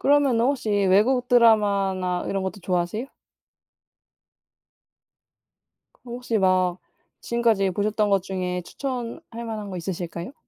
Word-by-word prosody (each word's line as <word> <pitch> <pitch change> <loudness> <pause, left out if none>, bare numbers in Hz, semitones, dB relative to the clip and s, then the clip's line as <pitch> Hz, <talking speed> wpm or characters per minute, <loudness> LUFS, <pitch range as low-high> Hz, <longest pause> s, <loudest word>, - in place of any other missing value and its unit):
그러면은 280 -5 +3
혹시 260 -5 -1
외국 205 +6 +3
드라마나 200 -6 +3
이런 195 -1 -2
것도 190 +1 -4
좋아하세요? 180 +5 -2 2.9
그럼 240 -1 -10
혹시 245 -2 -2
막 185 -2 +2 0.4
지금까지 230 -5 +1
보셨던 210 +2 0
것 195 -2 +3
중에 180 -2 -3
추천할 240 - -6
만한 215 -3 -5
거 185 - -5
있으실까요? 175 +4 -5
205 Hz, 270 characters per minute, -24 LUFS, 185-235 Hz, 2.9 s, 그러면은